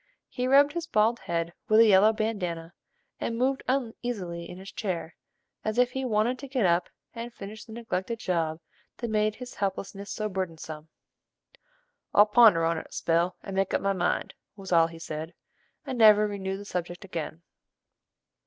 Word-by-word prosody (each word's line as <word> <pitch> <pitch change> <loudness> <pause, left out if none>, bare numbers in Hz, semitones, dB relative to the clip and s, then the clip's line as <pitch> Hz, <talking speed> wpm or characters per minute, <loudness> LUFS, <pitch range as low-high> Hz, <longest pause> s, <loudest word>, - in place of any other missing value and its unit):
He 250 0 -2
rubbed 280 +2 +5
his 340 -1 -3
bald 225 +3 +2
head 170 0 -2 0.2
with 215 +1 +6
a 230 - +9
yellow 210 +1 +6
bandana, 180 -7 -3 0.5
and 230 - -2
moved 265 +2 +1
uneasily 225 -9 -3
in 180 - -8
his 190 +1 -10
chair, 170 -6 -4 0.5
as 215 +1 -2
if 250 0 +4
he 265 +1 -3
wanted 235 +2 +1
to 275 - -7
get 255 -6 0
up 175 0 +2 0.2
and 235 +1 -6
finish 215 0 -9
the 220 - -11
neglected 230 -1 -3
job 165 -6 -1 0.4
that 235 -2 -4
made 215 0 +1
his 250 -1 -9
helplessness 200 0 -4
so 215 - -2
burdensome. 165 -5 -5 1.3
"I'll 205 - +8
ponder 210 -6 +6
on 165 0 +1
't - - -7
a - - -34
spell, 170 +2 +1
and 195 - -6
make 195 0 +1
up - - +1
my 195 0 +1
mind," 180 -2 -1 0.2
was 195 -2 -9
all 165 -1 +5
he 165 0 -11
said, 160 0 -6 0.5
and 260 -4 -4
never 215 -1 +7
renewed 195 -2 -3
the 205 - -9
subject 175 -1 -4
again. 165 -2 -6
200 Hz, 175 wpm, -28 LUFS, 170-230 Hz, 1.3 s, a